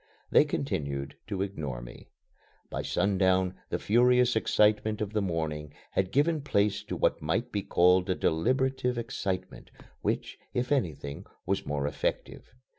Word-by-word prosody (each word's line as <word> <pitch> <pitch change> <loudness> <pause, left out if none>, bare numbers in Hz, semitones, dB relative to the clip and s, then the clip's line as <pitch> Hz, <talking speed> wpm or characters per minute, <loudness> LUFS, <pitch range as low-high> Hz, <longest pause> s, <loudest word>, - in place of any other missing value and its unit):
They - - +6
continued 70 - -3
to 100 -2 -1
ignore 75 -11 -4
me. - - -11 0.6
By - - -2
sundown 95 -1 +2 0.2
the - - 0
furious 125 +2 +4
excitement 105 -1 +2
of 105 0 -3
the 105 - +1
morning 80 -5 -3 0.2
had 95 -1 0
given 150 +3 +2
place 105 -7 +1
to - - -4
what - - +1
might 115 +11 -1
be 100 - -1
called 90 0 +3
a 95 - +2
deliberative 125 - +1
excitement, 95 -6 -4 0.3
which, - - -2 0.2
if 125 +2 -1
anything, 75 - -1 0.2
was 95 +2 -1
more 70 -1 -1
effective. 70 0 -3
95 Hz, 140 wpm, -29 LUFS, 80-120 Hz, 0.6 s, They